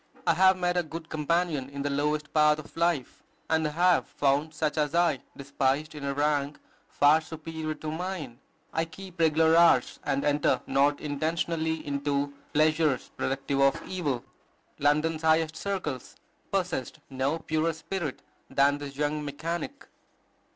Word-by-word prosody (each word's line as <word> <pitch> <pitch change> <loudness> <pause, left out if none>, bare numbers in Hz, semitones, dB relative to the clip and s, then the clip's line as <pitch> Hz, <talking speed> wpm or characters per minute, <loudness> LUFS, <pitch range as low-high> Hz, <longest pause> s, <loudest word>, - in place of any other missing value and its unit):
I - - +4
have 190 +2 +5
met 180 0 0
a - - +4
good 160 0 -8
companion 155 -3 0
in 140 0 -5
the 145 - 0
lowest 150 +2 -1
path 150 -1 +5
of 155 - -11
life, 165 -6 0 0.3
and 160 -1 +2
I - - -3
have 180 +2 +3
found 145 +3 +1
such 155 -1 -1
as 150 0 0
I 170 -5 +3 0.2
despised 140 +2 -1
in 150 -2 -8
a 140 0 -2
rank 145 0 0 0.3
far 150 +2 +4
superior 160 0 -5
to 155 0 -5
mine.... 160 -7 -5 0.3
I 160 - +1
keep 185 +1 -12
regular 160 0 +4
hours, 170 -7 +4
and 140 0 -1
enter 145 0 +2
not 140 +2 +2
intentionally 160 +2 -1
into 140 0 -1 0.2
pleasures 155 -3 +2
productive 135 +1 -1
of 135 0 +4
evil." 150 -10 -2 0.5
London's 155 +2 +2
highest 160 0 +2
circles 180 -11 -4 0.4
possessed 180 -9 -2
no 135 +4 0
purer 160 0 0
spirit 160 -2 -5 0.3
than 140 +1 +3
this 140 -1 -7
young 150 +1 -1
mechanic. 170 - -4
155 Hz, 150 wpm, -28 LUFS, 145-165 Hz, 0.5 s, have